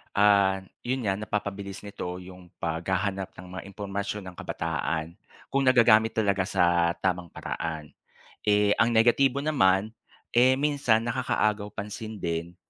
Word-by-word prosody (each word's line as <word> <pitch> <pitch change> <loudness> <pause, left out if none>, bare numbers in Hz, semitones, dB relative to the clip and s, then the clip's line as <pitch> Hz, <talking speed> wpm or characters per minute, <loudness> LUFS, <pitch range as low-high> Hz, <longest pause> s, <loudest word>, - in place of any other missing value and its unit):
ah, 100 -2 +4 0.2
'yon 130 0 -1
nga 95 -1 0
napapabilis 100 -2 -4
nito 95 -3 -6
'yong 90 0 -11 0.2
paghahanap 95 +4 -2
ng - - -10 0.2
mga - - -9
impormasyon 100 +1 -4
ng 95 -1 -10
kabataan, 80 +1 -3 0.3
kung 135 -1 +1
nagagamit 115 -3 +5
talaga 100 -3 +1
sa 85 -1 +2
tamang 90 -2 0
paraan. 80 -1 -5 0.6
Eh, 105 0 +4
ang 115 - +5
negatibo 130 +4 +3
naman, 110 -9 +2 0.4
eh 125 +2 +5
minsan 140 -5 +2
nakakaagaw 110 -4 0
pansin 110 +2 -6
din, 85 +1 -3
100 Hz, 130 wpm, -27 LUFS, 90-110 Hz, 0.6 s, nagagamit